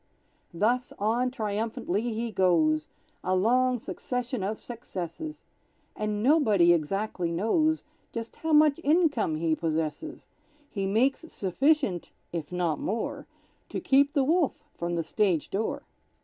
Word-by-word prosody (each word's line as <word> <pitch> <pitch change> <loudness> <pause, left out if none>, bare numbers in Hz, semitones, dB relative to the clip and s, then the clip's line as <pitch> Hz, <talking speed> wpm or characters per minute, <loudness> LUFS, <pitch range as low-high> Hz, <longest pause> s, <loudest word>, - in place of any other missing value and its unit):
Thus 235 +8 +1
on 230 +5 +1
triumphantly 215 -4 -2
he 230 0 -2
goes, 160 -5 +2 0.4
A 185 +1 +1
long 250 +6 +3
succession 250 +1 -4
of 205 +3 -2
successes, 240 - -7 0.5
And 210 0 -2
nobody 215 - +5
exactly 175 +2 -1
knows 310 - +1 0.3
Just 230 -1 -6
how 320 - -3
much 300 0 +5
income 295 - +2
he 160 0 +1
possesses; 160 - -3 0.5
He 195 -2 -2
makes 265 +10 +1
sufficient 220 - +1 0.2
(if 165 -2 -4
not 175 -4 0
more) 225 +3 -3 0.4
To - - -3
keep 280 +2 +3
the 280 - +3
wolf 320 +2 +1
from 170 0 -3
the 165 - 0
stage 175 -1 0
door. 215 +3 -2
215 Hz, 125 wpm, -28 LUFS, 175-260 Hz, 0.5 s, nobody